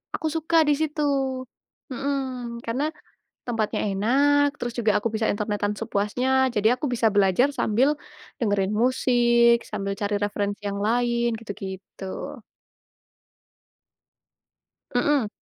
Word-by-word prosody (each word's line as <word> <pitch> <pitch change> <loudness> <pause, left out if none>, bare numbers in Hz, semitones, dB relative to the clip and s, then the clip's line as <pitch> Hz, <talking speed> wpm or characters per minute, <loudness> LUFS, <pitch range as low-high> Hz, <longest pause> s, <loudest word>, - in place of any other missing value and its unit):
Aku 315 - -2
suka 325 +1 +1
di - - +5
situ. 305 -1 -1 0.9
Mhm, 255 -3 -3
karena, 260 +6 0 0.6
tempatnya 225 -3 -1
enak, 285 +8 +3
terus 240 0 -3
juga 220 -2 +3
aku 220 - -1
bisa 220 0 0
internetan 205 0 -1
sepuasnya, 255 +6 +1
jadi 210 +1 +3
aku 300 - -2
bisa 230 -1 +2
belajar 200 +5 +4
sambil 250 0 +2 0.5
dengerin 205 -4 +1
musik, 240 -2 +3
sambil 200 -2 -3
cari 205 0 -1
referensi 205 0 -2
yang 200 0 -3
lain, 235 +2 +1
gitu-gitu. 195 -3 -7 2.6
Mhm. 260 -2 +2
235 Hz, 110 wpm, -24 LUFS, 205-260 Hz, 2.6 s, di